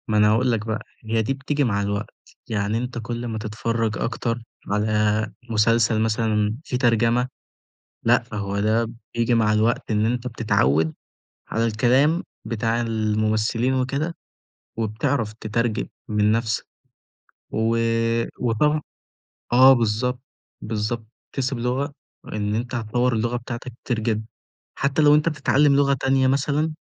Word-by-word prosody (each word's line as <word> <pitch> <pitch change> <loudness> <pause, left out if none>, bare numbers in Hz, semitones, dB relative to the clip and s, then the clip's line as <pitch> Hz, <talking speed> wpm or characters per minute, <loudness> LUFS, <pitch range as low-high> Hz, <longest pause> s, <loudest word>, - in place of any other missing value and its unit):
ما 110 -2 +1
أنا 105 0 +5
هاقول 125 +3 +2
لك 110 -2 -1
بقى، 110 -1 -2 0.2
هي 110 +1 +1
دي 110 +5 0
بتيجي 140 +2 -1
مع 100 -5 +1
الوقت 100 0 -3 0.3
يعني 105 0 -1
أنت 125 +1 -4
كل 120 +1 -4
ما 110 -1 -3
تتفرّج 110 +1 -2
أكتر، 115 0 -2 0.3
على 105 +1 +1 0.2
مسلسل 115 0 +3
مثلًا 110 -1 +1
في 125 - -2
ترجمة، 120 0 +2 0.8
لأ، - - +4
فهو 100 -1 -4
ده 110 +3 +2 0.3
بييجي 120 +1 +1
مع 110 -2 +3
الوقت 110 +2 +1
إن 105 0 +2
أنت 120 +1 -1
بتتعوّد 80 - +1 0.6
على 115 +1 0
الكلام 130 +9 +3 0.2
بتاع 115 +1 -1
الممثلين 110 +2 0
وكده 140 +6 -1 0.6
وبتعرف 110 +1 -1
تترجم 110 +1 -1 0.2
من 105 0 +2
نَفْسك، 115 0 0 0.9
و 110 +1 +1 0.6
وطبعًا 150 +6 +2 0.7
آه 130 +2 +8
بالضبط، 120 +1 0 0.4
بالضبط 110 +1 -3 0.3
تكتسب 135 -1 -1
لغة 130 +5 -1 0.3
وإن 105 0 -2
أنت 120 +3 -3
هتطوّر 120 +2 0
اللغة 120 +2 0
بتاعتك 120 +1 -6
كتير 120 -3 0
جدًا، 110 -1 -1 0.5
حتى 140 +3 +1
لو 145 0 +7
أنت 150 +2 +3
بتتعلم 145 -2 +3
لغة 140 -1 +4
تانية 135 0 +3
مثلًا 145 +4 +1
115 Hz, 135 wpm, -23 LUFS, 110-125 Hz, 0.9 s, آه